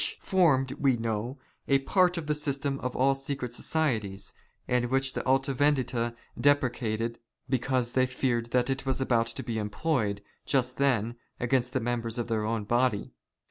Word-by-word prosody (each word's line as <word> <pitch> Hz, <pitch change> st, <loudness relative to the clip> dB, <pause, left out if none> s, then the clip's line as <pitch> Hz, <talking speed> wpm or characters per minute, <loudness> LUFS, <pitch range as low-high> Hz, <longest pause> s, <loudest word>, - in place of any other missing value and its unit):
83 165 Hz, -9 st, +4 dB
we 135 Hz, -3 st, +3 dB
know, 115 Hz, +3 st, -2 dB, 0.3 s
a 135 Hz, -, +5 dB
part 180 Hz, +6 st, +2 dB
of 165 Hz, -, -3 dB
the 150 Hz, -, +1 dB
system 140 Hz, -2 st, -2 dB
of 125 Hz, 0 st, -4 dB
all 135 Hz, +2 st, +4 dB
secret 135 Hz, -2 st, -4 dB
societies, 110 Hz, -11 st, -1 dB, 0.3 s
and 125 Hz, -1 st, +2 dB
which 135 Hz, +2 st, +1 dB
the -, -, -3 dB
Alta 135 Hz, +1 st, +2 dB
Vendita 130 Hz, -4 st, +1 dB, 0.2 s
deprecated 120 Hz, -5 st, +1 dB, 0.3 s
because 125 Hz, -1 st, 0 dB
they 130 Hz, 0 st, +3 dB
feared 125 Hz, -2 st, -1 dB
that 125 Hz, +2 st, +1 dB
it 135 Hz, 0 st, -2 dB
was 135 Hz, -1 st, -1 dB
about 115 Hz, -3 st, +1 dB
being 115 Hz, -2 st, -2 dB
employed, 105 Hz, -2 st, -1 dB, 0.2 s
just 130 Hz, -2 st, 0 dB
then, 120 Hz, -4 st, +1 dB, 0.2 s
against 125 Hz, 0 st, +1 dB
the 130 Hz, -, +1 dB
members 115 Hz, -1 st, -2 dB
of 120 Hz, -1 st, -3 dB
their 110 Hz, -2 st, 0 dB
own 110 Hz, -1 st, -1 dB
body. 120 Hz, -1 st, +1 dB
125 Hz, 160 wpm, -28 LUFS, 115-135 Hz, 0.3 s, a